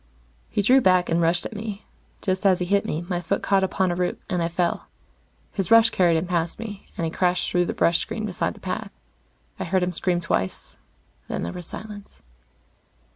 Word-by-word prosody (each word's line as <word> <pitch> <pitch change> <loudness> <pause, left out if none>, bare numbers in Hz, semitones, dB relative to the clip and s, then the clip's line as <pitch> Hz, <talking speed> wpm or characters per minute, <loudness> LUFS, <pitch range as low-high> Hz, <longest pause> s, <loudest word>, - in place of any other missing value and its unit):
He 205 - 0
drew 260 +6 +6
back 185 -4 +4
and 165 +1 +2
rushed 170 +2 +2
at - - -6
me. 210 -1 -6 0.4
Just 185 -1 0
as 190 -2 +5
he 180 - -2
hit 200 +2 +2
me, 160 +3 -2
my 175 -2 -1
foot 185 +4 -1
caught 195 -1 +3
upon 190 -1 +1
a - - -1
root, 180 0 -1
and 180 -2 +1
I 165 - +1
fell. 170 0 -1 0.6
His 195 -1 -2
rush 230 0 +7
carried 175 -3 +3
him 160 - -1
past 170 -2 -1
me, 210 -3 -8
and 165 - -1
he 160 - -2
crashed 180 +1 +1
through 175 0 +2
the - - -2
brush 170 0 +3
screen 215 -1 -3
beside 195 -4 -2
the - - -14
path. - - -4 0.7
I - - -1
heard 185 +1 +1
him 180 0 -1
scream 175 +1 +1
twice, 130 - -2 0.5
then - - -3
there 85 - -4
was 175 - -8
silence. 210 -2 -9
180 Hz, 210 wpm, -24 LUFS, 170-200 Hz, 0.7 s, rush